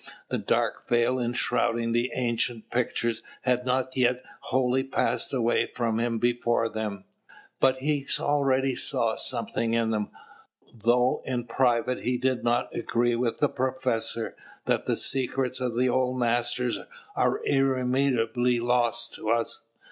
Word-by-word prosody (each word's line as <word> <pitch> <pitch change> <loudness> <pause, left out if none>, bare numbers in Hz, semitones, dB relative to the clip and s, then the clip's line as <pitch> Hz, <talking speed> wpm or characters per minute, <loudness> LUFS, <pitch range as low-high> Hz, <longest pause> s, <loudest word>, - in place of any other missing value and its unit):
The - - -1
dark - - 0
veil 120 +2 +2
enshrouding 120 -1 0
the 120 +2 +1
ancient 120 -2 -1
pictures 120 -2 0 0.2
had 125 0 +1
not 130 0 0
yet 125 -1 +2 0.2
wholly 130 0 +1
passed 135 - -1
away 120 -3 +1
from 115 0 0
before 120 -1 +1
them; 105 -3 -4 0.6
but 130 0 +4
he 140 +1 -1
already 135 -2 +2
saw - - +1
something 115 0 -1
in 115 -1 +1
them, 105 -2 -1 0.6
though 120 +2 +2
in 125 -2 -2
private 120 +1 +1
he 125 +1 0
did 130 0 0
not 120 +1 0
agree 120 0 +1
with 120 -1 -1
the 145 - +3
professor 125 -3 -2 0.3
that - - 0
the - - +1
secrets 130 -1 0
of 125 -2 -2
the 125 +1 +3
old 130 0 +1
masters 120 -1 0 0.4
are - - +2
irremediably 125 -2 +2
lost 120 -1 0
to 110 - -5
us. 115 0 0
120 Hz, 135 wpm, -27 LUFS, 115-130 Hz, 0.6 s, but